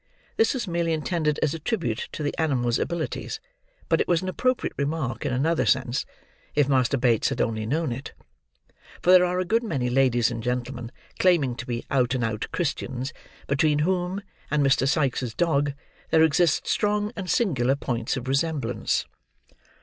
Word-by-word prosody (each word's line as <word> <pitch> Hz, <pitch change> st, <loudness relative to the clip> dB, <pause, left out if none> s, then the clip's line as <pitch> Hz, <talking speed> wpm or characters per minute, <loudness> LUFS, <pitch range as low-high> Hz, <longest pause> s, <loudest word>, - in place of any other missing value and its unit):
This 225 Hz, +4 st, +3 dB
was 240 Hz, -5 st, -3 dB
merely 170 Hz, -1 st, 0 dB
intended 155 Hz, -1 st, 0 dB
as 155 Hz, -, +2 dB
a 165 Hz, -, -5 dB
tribute 155 Hz, -, -2 dB
to 155 Hz, -, -4 dB
the 145 Hz, -, -1 dB
animal's 125 Hz, -7 st, +1 dB
abilities, 170 Hz, -2 st, -3 dB, 0.5 s
but -, -, +3 dB
it -, -, -1 dB
was 175 Hz, 0 st, +2 dB
an 185 Hz, -, -2 dB
appropriate 255 Hz, +6 st, 0 dB
remark 140 Hz, -3 st, -2 dB
in -, -, -1 dB
another 155 Hz, +6 st, +1 dB
sense, 130 Hz, 0 st, +1 dB, 0.5 s
if 145 Hz, -2 st, +3 dB
Master 135 Hz, -1 st, +2 dB
Bates 120 Hz, -3 st, +2 dB
had -, -, -4 dB
only 110 Hz, -2 st, -1 dB
known 155 Hz, +2 st, 0 dB
it; 135 Hz, +4 st, -6 dB, 0.9 s
for 180 Hz, -, +5 dB
there 185 Hz, -1 st, +8 dB
are 180 Hz, 0 st, 0 dB
a 185 Hz, -, 0 dB
good 225 Hz, +5 st, +2 dB
many 135 Hz, -, -1 dB
ladies 125 Hz, -2 st, +3 dB
and 115 Hz, -1 st, -4 dB
gentlemen, 120 Hz, 0 st, -3 dB, 0.3 s
claiming 160 Hz, -9 st, +3 dB
to 125 Hz, -, -7 dB
be 120 Hz, -1 st, -3 dB
out 130 Hz, -1 st, +2 dB
and 125 Hz, -, -1 dB
out 110 Hz, -1 st, -2 dB
Christians, 135 Hz, -4 st, -2 dB, 0.3 s
between 145 Hz, +2 st, +2 dB
whom, 185 Hz, +2 st, -1 dB, 0.3 s
and 145 Hz, -1 st, +2 dB
Mr. 135 Hz, 0 st, +3 dB
Sikes' 130 Hz, -5 st, 0 dB
dog, 145 Hz, -4 st, +1 dB, 0.4 s
there 160 Hz, -, +5 dB
exist 160 Hz, 0 st, +3 dB
strong 210 Hz, 0 st, +1 dB
and 190 Hz, -3 st, -5 dB
singular 135 Hz, -, +2 dB
points 120 Hz, -3 st, -2 dB
of 130 Hz, 0 st, -6 dB
resemblance. 135 Hz, -5 st, 0 dB
140 Hz, 175 wpm, -25 LUFS, 125-170 Hz, 0.9 s, there